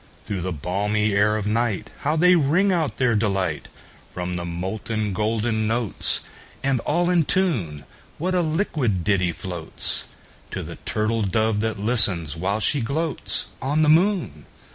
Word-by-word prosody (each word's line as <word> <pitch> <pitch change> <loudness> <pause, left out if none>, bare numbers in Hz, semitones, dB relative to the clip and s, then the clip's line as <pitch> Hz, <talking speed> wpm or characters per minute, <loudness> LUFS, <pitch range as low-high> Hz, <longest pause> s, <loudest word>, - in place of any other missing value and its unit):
Through 100 -3 -3
the 95 +1 -3
balmy 100 +6 -1
air 105 +2 +3
of 105 - -3
nightHow 120 - -1
they 180 +2 +6
ring 175 +5 +3
out 165 -5 0
their 125 -3 +2
delight! 95 -7 -1 0.5
From 90 0 -3
the 85 -1 -4
molten 100 +4 -3
golden 110 +2 0
notes, 115 -2 +1 0.4
And 135 -2 +1
all 175 +8 +1
in 175 -2 +4
tune, 115 - -1 0.3
What 185 +4 -1
a 180 - +2
liquid 155 - 0
ditty 90 -3 +2
floatsTo 85 -2 -5
the - - -8
turtle 110 +1 0
dove 110 +2 +1
that 110 0 -1
listens, 100 -8 +3
while 95 +5 -1
she 140 +5 +1
gloatsOn 150 +1 -1
the 150 - +4
moon! 160 - +2
110 Hz, 140 wpm, -23 LUFS, 95-145 Hz, 0.5 s, they